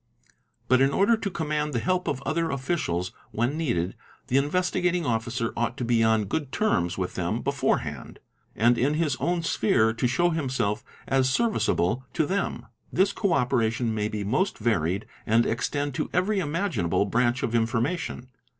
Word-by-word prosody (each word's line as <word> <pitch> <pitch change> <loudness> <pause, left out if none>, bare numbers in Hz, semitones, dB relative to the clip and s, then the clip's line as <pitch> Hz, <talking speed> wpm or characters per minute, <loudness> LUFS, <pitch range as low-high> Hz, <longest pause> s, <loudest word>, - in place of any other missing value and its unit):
But 130 +1 +4
in 135 - +5
order 200 +10 +3
to 220 -2 -3
command 150 -4 -2
the 120 - +1
help 185 +6 0
of 135 - -2
other 165 +3 0
_ - - -3
officials 130 - -1 0.2
when 120 +6 -1
needed, 105 - -1 0.3
the 130 - +3
Investigating 180 +3 +1
Officer 115 -1 -1
ought 120 +2 -1
to 125 - -2
be 115 -1 +3
on 110 -1 +3
good 140 +7 -3
terms 90 - 0
with 95 -1 -2
them - - -2
beforehand - - -1 0.4
and 120 +3 +3
in 145 +4 +2
his 155 -4 +1
own 175 -1 0
sphere 110 -6 +2
to 125 +2 0
show 175 +8 +2
himself 125 -9 -1 0.2
as 135 -1 +2
service 225 - +1
able 110 +9 +1
to 160 - +2
them. 195 +5 -2 0.3
This 195 +3 +2
co 200 -5 0
operation 120 -4 +1
may 105 -1 -1
be 105 -1 -4
most 135 - 0
varied 100 -4 0 0.2
and 115 +2 +4
extend 145 +5 -1
to - - -2
every 195 +3 +1
imaginable 160 - 0
branch 120 +2 +1
of 115 - -1
information. 120 +3 -1
130 Hz, 170 wpm, -26 LUFS, 115-165 Hz, 0.4 s, in